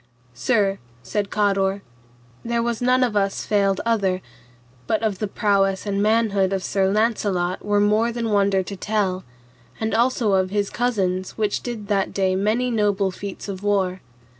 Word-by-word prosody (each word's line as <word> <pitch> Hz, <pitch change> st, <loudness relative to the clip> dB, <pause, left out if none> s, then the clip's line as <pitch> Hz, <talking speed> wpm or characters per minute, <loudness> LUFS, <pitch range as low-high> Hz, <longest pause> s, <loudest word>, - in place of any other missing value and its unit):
Sir, 195 Hz, -, +1 dB, 0.2 s
said 205 Hz, -, -2 dB
Cador, 195 Hz, -1 st, +1 dB, 0.6 s
there 235 Hz, 0 st, 0 dB
was 235 Hz, -1 st, -2 dB
none 255 Hz, +1 st, +3 dB
of 235 Hz, -4 st, 0 dB
us 195 Hz, -1 st, 0 dB
failed 200 Hz, -2 st, +1 dB
other, 200 Hz, -5 st, +1 dB, 0.7 s
but 220 Hz, -, 0 dB
of 205 Hz, -4 st, -1 dB
the 215 Hz, -, -1 dB
prowess 195 Hz, -1 st, +1 dB
and 200 Hz, -1 st, -1 dB
manhood 210 Hz, -3 st, +2 dB
of 190 Hz, -1 st, -2 dB
Sir 190 Hz, 0 st, +1 dB
Launcelot 205 Hz, -5 st, 0 dB
were 205 Hz, 0 st, +2 dB
more 215 Hz, +3 st, +3 dB
than 230 Hz, -1 st, -2 dB
wonder 200 Hz, -2 st, +2 dB
to 200 Hz, -, -7 dB
tell, 195 Hz, -2 st, -1 dB, 0.6 s
and 220 Hz, 0 st, -1 dB
also 235 Hz, -2 st, +2 dB
of 185 Hz, -1 st, +2 dB
his 205 Hz, 0 st, -1 dB
cousins 190 Hz, -7 st, -1 dB
which 210 Hz, -2 st, 0 dB
did 230 Hz, -4 st, -6 dB
that 200 Hz, -2 st, 0 dB
day 190 Hz, -1 st, +1 dB
many 220 Hz, +6 st, +1 dB
noble 205 Hz, -3 st, +1 dB
feats 200 Hz, +2 st, -7 dB
of 195 Hz, -2 st, -5 dB
war. 190 Hz, -3 st, 0 dB
205 Hz, 165 wpm, -22 LUFS, 195-220 Hz, 0.7 s, none